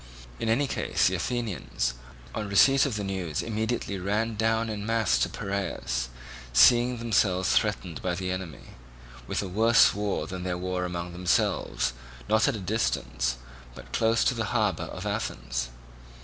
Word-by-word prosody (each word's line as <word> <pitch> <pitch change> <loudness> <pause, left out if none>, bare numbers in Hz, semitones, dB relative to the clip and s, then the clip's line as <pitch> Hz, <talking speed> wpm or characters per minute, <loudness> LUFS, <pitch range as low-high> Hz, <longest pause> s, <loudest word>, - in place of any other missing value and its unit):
In 115 - -1
any 125 +6 +3
case 135 - 0
the - - +1
Athenians, 90 - -2 0.4
on 105 -2 -3
receipt 135 +8 +5
of 125 - -3
the 105 - -2
news 95 -6 -2
immediately 110 -2 -2
ran 105 +5 0
down 110 +1 +1
in 105 -2 -4
mass 110 - +2
to - - +1
Piraeus, 65 -11 -3 0.4
seeing 120 - +6
themselves 100 -5 +1
threatened 95 - 0
by 90 -1 -1
the 90 0 -3
enemy 90 -7 -6 0.5
with - - -1
a - - -4
worse 110 +5 +5
war 100 0 -2
than 95 0 -6
their 90 -1 -2
war 90 0 -2
among 90 0 -4
themselves, 65 -8 0 0.3
not 110 +1 +3
at 140 - +1
a - - -4
distance, 60 - -1 0.4
but - - -12
close 115 0 +3
to - - +2
the 115 -2 -2
harbour 105 -5 0
of - - -7
Athens. - - -3
100 Hz, 160 wpm, -27 LUFS, 90-110 Hz, 0.5 s, seeing